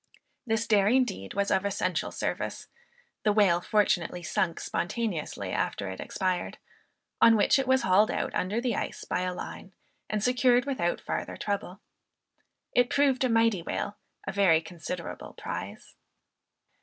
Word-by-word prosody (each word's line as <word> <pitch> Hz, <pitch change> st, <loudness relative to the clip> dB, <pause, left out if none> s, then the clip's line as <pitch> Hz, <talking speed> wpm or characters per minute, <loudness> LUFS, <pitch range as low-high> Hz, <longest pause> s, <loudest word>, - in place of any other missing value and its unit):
This 225 Hz, 0 st, +1 dB
daring 220 Hz, +4 st, +4 dB
deed 95 Hz, -, -7 dB
was 200 Hz, 0 st, 0 dB
of 190 Hz, -, +2 dB
essential 185 Hz, -3 st, -1 dB
service. -, -, -3 dB, 0.5 s
The 210 Hz, -, +3 dB
whale 195 Hz, -5 st, +4 dB
fortunately 180 Hz, -4 st, +1 dB
sunk 170 Hz, +1 st, -1 dB
spontaneously 185 Hz, -4 st, -3 dB
after 100 Hz, -, -2 dB
it 95 Hz, -, -8 dB
expired; 185 Hz, -2 st, -2 dB, 0.6 s
on 230 Hz, -, +8 dB
which 215 Hz, +6 st, +4 dB
it 265 Hz, -, -1 dB
was 260 Hz, 0 st, +3 dB
hauled 195 Hz, +4 st, +4 dB
out -, -, -2 dB
under 200 Hz, +5 st, 0 dB
the 240 Hz, -3 st, 0 dB
ice -, -, -4 dB
by 180 Hz, -, -1 dB
the 180 Hz, -, -2 dB
line 190 Hz, +1 st, -8 dB, 0.4 s
and 210 Hz, -1 st, -1 dB
secured 250 Hz, +1 st, +3 dB
without 255 Hz, -12 st, -1 dB
farther -, -, -4 dB
trouble. 200 Hz, -2 st, -3 dB, 0.9 s
It 245 Hz, +1 st, +3 dB
proved 275 Hz, -2 st, +2 dB
a 255 Hz, -, +2 dB
mighty 225 Hz, -5 st, +3 dB
whale; 200 Hz, +4 st, -3 dB, 0.3 s
a -, -, -2 dB
very 190 Hz, -5 st, +4 dB
considerable 170 Hz, +1 st, -7 dB
prize. -, -, -6 dB
200 Hz, 145 wpm, -28 LUFS, 180-230 Hz, 0.9 s, on